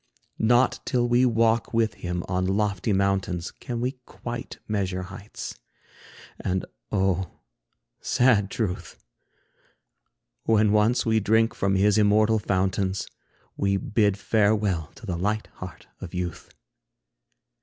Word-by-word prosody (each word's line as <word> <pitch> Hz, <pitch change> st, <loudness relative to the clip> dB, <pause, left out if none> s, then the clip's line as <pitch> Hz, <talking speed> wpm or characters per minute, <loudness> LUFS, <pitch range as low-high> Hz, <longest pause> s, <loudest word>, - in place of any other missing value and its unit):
Not 120 Hz, +3 st, +3 dB
till 120 Hz, -1 st, +1 dB
we 120 Hz, +1 st, +4 dB
walk 115 Hz, 0 st, +2 dB
with 115 Hz, -1 st, +2 dB
him 90 Hz, 0 st, -4 dB
on 90 Hz, 0 st, 0 dB
lofty 100 Hz, +1 st, 0 dB
mountains, 95 Hz, -3 st, 0 dB
Can 120 Hz, -1 st, -6 dB
we 125 Hz, +1 st, -2 dB
quite 120 Hz, 0 st, -7 dB
measure 95 Hz, -3 st, -1 dB
heights. 100 Hz, +3 st, -8 dB, 0.8 s
And, 95 Hz, 0 st, -1 dB, 0.3 s
oh, 95 Hz, -3 st, +1 dB, 0.7 s
sad 115 Hz, -6 st, +3 dB
truth! 100 Hz, -4 st, -3 dB, 1.5 s
When 110 Hz, -2 st, +4 dB
once 105 Hz, +3 st, +3 dB
we 110 Hz, -1 st, +3 dB
drink 110 Hz, +2 st, +3 dB
from 95 Hz, 0 st, 0 dB
his 100 Hz, +2 st, +4 dB
immortal 110 Hz, +1 st, +4 dB
fountains, 95 Hz, -1 st, 0 dB, 0.5 s
We 100 Hz, 0 st, +1 dB
bid 105 Hz, -1 st, +1 dB
farewell 105 Hz, -6 st, +1 dB
to 115 Hz, -, -12 dB
the 90 Hz, -5 st, -2 dB
light 105 Hz, +3 st, 0 dB
heart 95 Hz, -1 st, -9 dB
of 95 Hz, -1 st, -8 dB
youth. 90 Hz, -1 st, -4 dB
105 Hz, 120 wpm, -25 LUFS, 95-110 Hz, 1.5 s, we